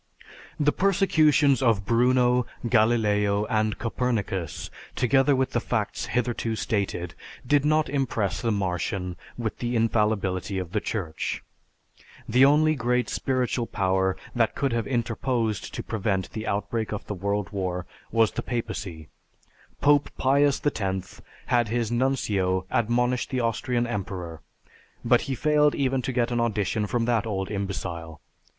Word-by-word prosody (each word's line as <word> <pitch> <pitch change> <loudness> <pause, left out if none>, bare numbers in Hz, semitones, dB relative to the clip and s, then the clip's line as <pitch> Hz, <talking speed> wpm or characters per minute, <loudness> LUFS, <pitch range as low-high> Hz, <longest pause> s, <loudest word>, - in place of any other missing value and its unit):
The 150 0 +3
persecutions 155 - +3
of 115 -6 +2
Bruno, 125 +1 +3 0.2
Galileo, 105 -3 +2
and 110 -1 +1
Copernicus, 105 - -2 0.2
together 135 +3 +3
with 130 0 0
the - - +1
facts - - -2
hitherto 120 -1 -1
stated, 95 -6 -2 0.3
did 145 +2 +3
not 155 0 +3
impress 110 -8 -1
the 115 - 0
Martian 90 -2 -2 0.2
with 115 -3 -3
the 120 0 -2
"infallibility" 105 -4 +1
of 90 -3 -4
the 105 - +1
Church. 90 -8 -3 0.8
The 125 +4 +4
only 150 +3 +5
great 125 -2 0
spiritual 125 -2 -1
power 95 -1 +1 0.2
that 115 -2 +1
could 135 -4 0
have 115 -1 -1
interposed 120 -3 -1
to - - -4
prevent 100 -3 -2
the 110 0 -5
outbreak 105 +2 -2
of 105 -1 -4
the - - -4
World 100 -1 -2
War 90 -3 -2 0.3
was 115 -2 +3
the - - -3
papacy. 105 -9 -4 0.7
Pope 145 0 +4
Pius 140 +1 +3
X 95 -9 -2 0.2
had 120 -2 +2
his 115 0 -1
Nuncio 105 -8 +1
admonish 125 +2 +1
the 130 -2 -1
Austrian 120 +1 0
emperor, 95 -7 -5 0.6
but - - +4
he 135 - 0
failed 150 +2 +3
even 135 -1 +1
to 125 - -2
get 120 -1 0
an 120 - 0
audition 105 -2 0
from 115 +2 0
that 115 -2 +1
old 95 -2 -3
imbecile. 90 -5 -4
115 Hz, 140 wpm, -26 LUFS, 100-125 Hz, 0.8 s, only